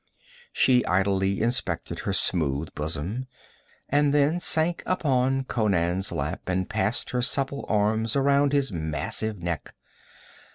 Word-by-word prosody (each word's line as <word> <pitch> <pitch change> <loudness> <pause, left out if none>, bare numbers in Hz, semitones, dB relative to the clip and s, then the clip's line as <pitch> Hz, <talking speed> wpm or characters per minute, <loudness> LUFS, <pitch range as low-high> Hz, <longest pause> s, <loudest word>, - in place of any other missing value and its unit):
She 125 -2 +3
idly 95 +1 +1
inspected 90 -8 -2
her 100 - -2
smooth 80 -6 0
bosom, 85 - -3 0.6
and 145 0 +2
then 145 +4 +2
sank 170 0 +2
upon 135 -6 +1
Conan's 95 -6 0
lap 80 +2 -3
and 95 0 -1
passed 110 +1 -1
her 125 - 0
supple 135 +2 -1
arms 110 +2 +1
around 140 +1 +3
his 140 -3 +1
massive 85 +5 -2
neck. 85 -5 -4
110 Hz, 120 wpm, -25 LUFS, 90-135 Hz, 0.6 s, She